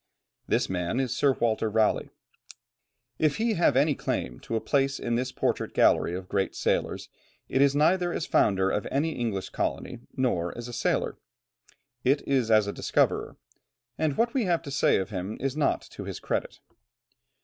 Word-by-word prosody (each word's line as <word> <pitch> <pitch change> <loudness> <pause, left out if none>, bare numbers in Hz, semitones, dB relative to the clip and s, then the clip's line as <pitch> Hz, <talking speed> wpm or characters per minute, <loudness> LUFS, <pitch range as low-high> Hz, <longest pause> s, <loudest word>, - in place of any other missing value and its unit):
This - - +1
man 90 +5 -1
is 130 -3 -1
Sir 140 -2 +3
Walter 115 -2 0
Raleigh. 110 0 +1 1.1
If 155 -2 +2
he 225 0 +1
have 170 - +3
any 145 +2 +4
claim 60 - -3
to 115 - -5
a - - +2
place 135 +2 +1
in 120 - -2
this 125 +2 -1
portrait - - -2
gallery 85 - +3
of 95 0 -6
great 95 0 -1
sailors, - - -1 0.4
it 130 - +1
is 140 0 +4
neither 175 +4 +3
as 165 - -2
founder 95 -1 +2
of 105 - -1
any 150 +4 0
English 115 -9 -3
colony - - -3 0.2
nor 90 -10 0
as 120 0 -6
a 120 - -8
sailor; 120 - -1 0.8
it 140 +3 +1
is 130 -5 +1
as 110 -2 +5
a 100 - -3
discoverer, - - 0 0.6
and 155 -3 -1
what 235 +1 +2
we 255 -5 +1
have 175 -2 +1
to 140 - -7
say 140 - +3
of 95 +3 -3
him 95 +2 -4
is 135 0 -2
not 150 -2 +1
to - - -8
his - - -6
credit. - - -3
130 Hz, 180 wpm, -27 LUFS, 105-145 Hz, 1.1 s, as